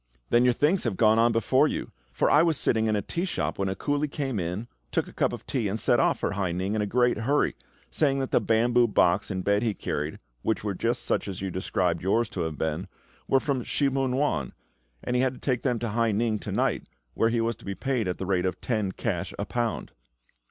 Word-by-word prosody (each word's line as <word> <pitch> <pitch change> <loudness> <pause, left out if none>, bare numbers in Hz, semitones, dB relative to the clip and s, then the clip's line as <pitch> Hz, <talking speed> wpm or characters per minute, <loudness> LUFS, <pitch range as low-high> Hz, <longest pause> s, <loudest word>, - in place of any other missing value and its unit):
"Then 120 - +5
your 125 0 +4
things 155 +9 +2
have 110 -6 -2
gone 110 0 +5
on 120 +1 +4
before 130 +6 +3
you; - - -4 0.2
for 65 - +1
I 145 - +6
was 165 -3 +2
sitting 110 -4 +1
in 110 - +2
a 100 - -1
tea 170 - -3
shop 185 - -2
when 95 -1 0
a 95 - -2
coolie 145 +4 -1
came 135 -8 -2
in, 90 +7 -3 0.2
took - - 0
a - - -12
cup - - +1
of - - -7
tea, 120 -6 -1
and 105 +3 -2
set - - +3
off - - +3
for - - -1
Hai 100 -3 -1
ning 95 +3 -2
in 110 - 0
a 105 - -1
great 120 +2 +2
hurry, 140 +6 +1 0.4
saying 140 -3 +2
that 135 -1 -2
the - - +3
bamboo 120 +2 +3
box 95 -2 +2
and 95 -2 -3
bed 100 +1 +2
he 110 -4 0
carried, - - -3 0.2
which 110 - -1
were 105 -2 -1
just 115 +6 -1
such - - 0
as 95 -2 -5
you 95 - -2
describe 90 -1 -1
yours 115 +6 +1
to - - -4
have 80 -3 -3
been, 80 +5 -2 0.4
were 135 - +4
from 130 -3 -1
Shih 140 +3 +1
mun 135 -1 0
wan, 130 - 0 0.5
and 125 - -2
he 125 - +3
had 130 0 +1
to - - -13
take 125 -3 -1
them 125 -3 0
to 115 0 -3
Hai 115 +1 +1
ning 110 0 0
to - - -6
night, - - 0 0.2
where 115 - +2
he 115 0 0
was 115 0 0
to - - -16
be 100 -1 -4
paid 125 -5 -1
at 90 - -2
the 95 - -4
rate 95 -1 +1
of 90 - -3
ten 105 -6 -1
cash - - -3
a - - -2
pound." 120 -3 -2
115 Hz, 250 wpm, -27 LUFS, 100-125 Hz, 0.5 s, I